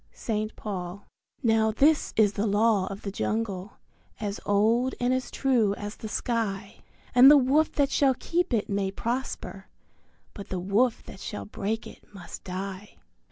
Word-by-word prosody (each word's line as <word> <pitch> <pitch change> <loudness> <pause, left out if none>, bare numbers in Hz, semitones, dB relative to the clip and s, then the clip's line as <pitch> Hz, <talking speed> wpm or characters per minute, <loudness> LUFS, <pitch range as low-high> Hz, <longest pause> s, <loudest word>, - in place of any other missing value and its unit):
St. 215 -1 -3
Paul. 190 -1 -6 0.4
Now 220 -2 +3
this 290 +8 +3
is 210 -2 +4
the 205 +3 -1
Law 205 -1 +2
of 195 +1 -7
the 200 - -4
Jungle 205 -2 -3 0.5
as 205 -2 -3
old 225 +6 +2
and 245 +1 +1
as 255 0 -2
true 235 -7 +1
as 205 0 -6
the 220 - -7
sky; 210 -3 -2 0.3
And 250 +2 +9
the 295 - +9
Wolf 280 +4 +3
that 285 -2 +1
shall 270 -2 +3
keep 345 +5 -1
it 225 -4 0
may 200 -1 -1
prosper, 240 +7 -4 0.7
but 200 - -9
the 185 - -2
Wolf 210 +6 +1
that 190 - -11
shall 100 - -6
break 215 - -3
it - - -12
must 175 -3 -9
die. 190 +2 -6
215 Hz, 160 wpm, -27 LUFS, 200-245 Hz, 0.7 s, And